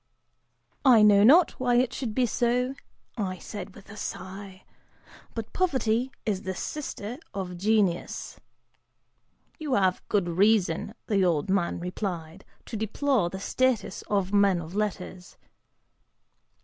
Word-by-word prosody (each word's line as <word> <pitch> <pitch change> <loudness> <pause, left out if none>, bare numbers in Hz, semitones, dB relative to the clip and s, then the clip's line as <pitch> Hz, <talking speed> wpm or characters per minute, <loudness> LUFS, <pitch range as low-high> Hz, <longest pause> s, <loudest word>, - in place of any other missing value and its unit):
"I 235 -5 +7
know 205 -1 +6
not 315 +10 +6
why 245 -1 +2
it 250 0 +2
should 225 -5 -4
be 255 - +3
so," 245 +2 0 0.5
(I 185 -3 -2
said 195 +1 -8
with - - -14
a - - -10
sigh), 190 -1 -7 0.7
"but 225 -1 -6
Poverty 260 -8 +1
is 200 -3 -1
the 190 -1 -4
sister 250 -2 -5 0.2
of 185 -2 -4
Genius." 195 -2 0 1.2
("You 300 -4 -1
have 190 -2 +2
good 200 -4 +1
reason," 195 +2 +2
the 200 -3 +2
old 170 -1 +1
man 180 -4 0
replied, 180 -1 -5 0.2
"to - - -7
deplore 220 -1 0
the 190 - -6
status 255 +3 0
of 195 -1 0
men 200 -3 +4
of 165 +1 -8
letters." 185 -3 -4
205 Hz, 130 wpm, -27 LUFS, 185-235 Hz, 1.2 s, I